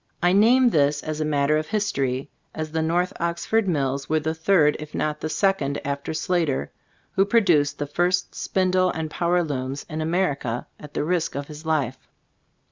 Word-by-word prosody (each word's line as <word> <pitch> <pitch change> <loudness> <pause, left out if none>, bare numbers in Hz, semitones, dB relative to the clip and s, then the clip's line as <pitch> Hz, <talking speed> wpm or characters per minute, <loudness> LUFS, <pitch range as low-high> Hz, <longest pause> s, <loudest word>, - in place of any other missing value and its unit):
I 175 +1 +4
name 240 +5 +5
this 145 -2 +2
as 155 0 -3
a - - 0
matter 150 0 +2
of 155 - -5
history, 140 -11 -1 0.2
as 155 -1 -4
the 160 0 0
North 175 +3 0
Oxford 170 +6 0
Mills 140 -5 -1
were 155 0 +2
the 160 +1 -2
third, 160 -2 +3
if 150 0 -8
not 150 0 -2
the 155 - -2
second 175 -7 +1
after 140 +1 -3
Slater, 160 - -1 0.4
who 195 - +3
produced 185 -9 +3
the 145 - -2
first 175 +5 0
spindle 185 -1 +1
and 160 -2 -4
power 175 +2 +1
looms 135 -2 -4
in 155 -1 -4
America, 155 -8 -1
at 150 -1 -12
the - - 0
risk 170 -1 -1
of 140 0 -3
his 155 +2 -10
life. 135 -5 0
155 Hz, 180 wpm, -24 LUFS, 145-180 Hz, 0.4 s, name